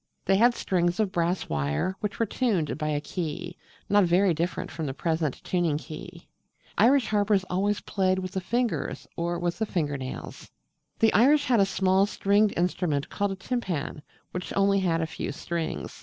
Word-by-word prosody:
They 195 Hz, -, +4 dB
had 235 Hz, +3 st, +5 dB
strings 175 Hz, 0 st, 0 dB
of 210 Hz, -3 st, +1 dB
brass 175 Hz, -1 st, 0 dB
wire 75 Hz, -, -1 dB
which 210 Hz, -1 st, -3 dB
were 230 Hz, -, +2 dB
tuned 200 Hz, -, 0 dB
by 155 Hz, -, -1 dB
a 150 Hz, -1 st, 0 dB
key, 175 Hz, +2 st, -5 dB, 0.3 s
not 205 Hz, -1 st, +4 dB
very 180 Hz, +2 st, +3 dB
different 175 Hz, +3 st, -2 dB
from 160 Hz, -2 st, -4 dB
the 135 Hz, -, -4 dB
present 160 Hz, -3 st, -1 dB
tuning 175 Hz, -5 st, +1 dB
key. 155 Hz, 0 st, -9 dB, 0.5 s
Irish 265 Hz, 0 st, +4 dB
harpers 205 Hz, -2 st, +2 dB
always 200 Hz, +3 st, +1 dB
played 185 Hz, -1 st, +1 dB
with 185 Hz, -1 st, -4 dB
the 190 Hz, -1 st, -2 dB
fingers 235 Hz, +4 st, -2 dB
or 170 Hz, +1 st, -1 dB
with 175 Hz, +2 st, -2 dB
the 220 Hz, -, 0 dB
finger 150 Hz, -7 st, -1 dB
nails. 130 Hz, 0 st, -7 dB, 0.5 s
The 225 Hz, -1 st, +4 dB
Irish 285 Hz, +6 st, +5 dB
had 245 Hz, -5 st, +3 dB
a 195 Hz, -, +4 dB
small 190 Hz, 0 st, +2 dB
stringed 205 Hz, +1 st, +2 dB
instrument 170 Hz, -4 st, 0 dB
called 200 Hz, -1 st, -1 dB
a -, -, -6 dB
Timpan, 185 Hz, -, -3 dB, 0.3 s
which 180 Hz, 0 st, -5 dB
had -, -, -5 dB
only 195 Hz, 0 st, +3 dB
a 165 Hz, -1 st, +1 dB
few 160 Hz, -, -5 dB
strings. 165 Hz, +3 st, -4 dB
185 Hz, 180 wpm, -27 LUFS, 165-205 Hz, 0.5 s, had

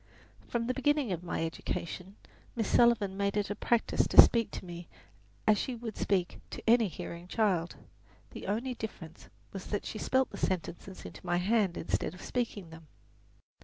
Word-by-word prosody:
From 235 Hz, -1 st, -1 dB
the 255 Hz, -, 0 dB
beginning 280 Hz, -2 st, +1 dB
of 175 Hz, -1 st, -3 dB
my 170 Hz, -2 st, -2 dB
education 180 Hz, +3 st, -5 dB, 0.4 s
Miss 225 Hz, -3 st, 0 dB
Sullivan 225 Hz, -5 st, +4 dB
made 200 Hz, +1 st, 0 dB
it 205 Hz, 0 st, 0 dB
a -, -, -2 dB
practice 235 Hz, +1 st, +1 dB
to -, -, +4 dB
speak 230 Hz, -2 st, +8 dB
to -, -, -7 dB
me 175 Hz, -1 st, -8 dB, 0.6 s
as 210 Hz, -2 st, +5 dB
she 255 Hz, -, -2 dB
would 225 Hz, -2 st, -6 dB
speak 185 Hz, -3 st, 0 dB
to -, -, -7 dB
any 230 Hz, -1 st, +6 dB
hearing 170 Hz, 0 st, -7 dB
child; 185 Hz, -5 st, +1 dB, 0.6 s
the -, -, -8 dB
only 235 Hz, +6 st, -1 dB
difference 180 Hz, -8 st, -8 dB, 0.2 s
was 195 Hz, -2 st, -6 dB
that 205 Hz, -, -2 dB
she 215 Hz, -, -5 dB
spelled 260 Hz, 0 st, +1 dB
the -, -, -7 dB
sentences 185 Hz, +1 st, -3 dB
into 90 Hz, +3 st, -10 dB
my 175 Hz, -, +1 dB
hand 195 Hz, -1 st, +2 dB
instead 165 Hz, -, -2 dB
of 180 Hz, -, -11 dB
speaking 215 Hz, -8 st, -3 dB
them. 160 Hz, -1 st, -12 dB
200 Hz, 175 wpm, -31 LUFS, 175-230 Hz, 0.6 s, speak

